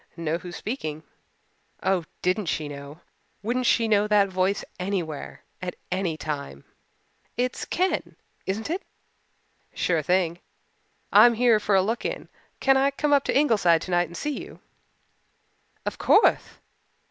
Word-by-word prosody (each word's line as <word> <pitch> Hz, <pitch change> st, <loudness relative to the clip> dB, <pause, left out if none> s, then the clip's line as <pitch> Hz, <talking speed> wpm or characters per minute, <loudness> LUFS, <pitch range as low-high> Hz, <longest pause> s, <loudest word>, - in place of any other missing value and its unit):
"Know 165 Hz, 0 st, -1 dB
who's 180 Hz, 0 st, -8 dB
speaking?" 155 Hz, -, -4 dB, 0.8 s
Oh, 190 Hz, -3 st, +1 dB, 0.2 s
didn't 185 Hz, +2 st, +1 dB
she 155 Hz, -2 st, -1 dB
know! 145 Hz, +3 st, -9 dB, 0.4 s
Wouldn't 245 Hz, +3 st, 0 dB
she 230 Hz, -1 st, +3 dB
know 210 Hz, -1 st, +3 dB
that 205 Hz, -2 st, +4 dB
voice 190 Hz, +2 st, 0 dB
anywhere 180 Hz, -6 st, -4 dB, 0.2 s
at 180 Hz, -1 st, -4 dB, 0.2 s
any 180 Hz, -3 st, -1 dB
time? 140 Hz, -, -5 dB, 0.7 s
"It's 250 Hz, +1 st, -1 dB
Ken 370 Hz, +2 st, -1 dB, 0.3 s
isn't 220 Hz, +9 st, -2 dB
it?" 365 Hz, +4 st, -1 dB, 0.9 s
"Sure 165 Hz, -3 st, +1 dB
thing. 175 Hz, +1 st, +1 dB, 0.7 s
I'm 240 Hz, -1 st, +8 dB
here 235 Hz, -2 st, +4 dB
for 205 Hz, -1 st, +1 dB
a 190 Hz, -, +5 dB
look 225 Hz, +4 st, -2 dB
in. -, -, -4 dB, 0.3 s
Can 270 Hz, 0 st, +4 dB
I 270 Hz, +1 st, +4 dB
come 290 Hz, +1 st, 0 dB
up 280 Hz, -1 st, +4 dB
to -, -, +2 dB
Ingleside 205 Hz, -, +3 dB
tonight 175 Hz, -1 st, +1 dB
and 170 Hz, +2 st, -9 dB
see 295 Hz, -1 st, -3 dB
you?" -, -, -11 dB, 1.3 s
"Of -, -, -4 dB
courthe." -, -, +3 dB
190 Hz, 140 wpm, -25 LUFS, 170-235 Hz, 1.3 s, I'm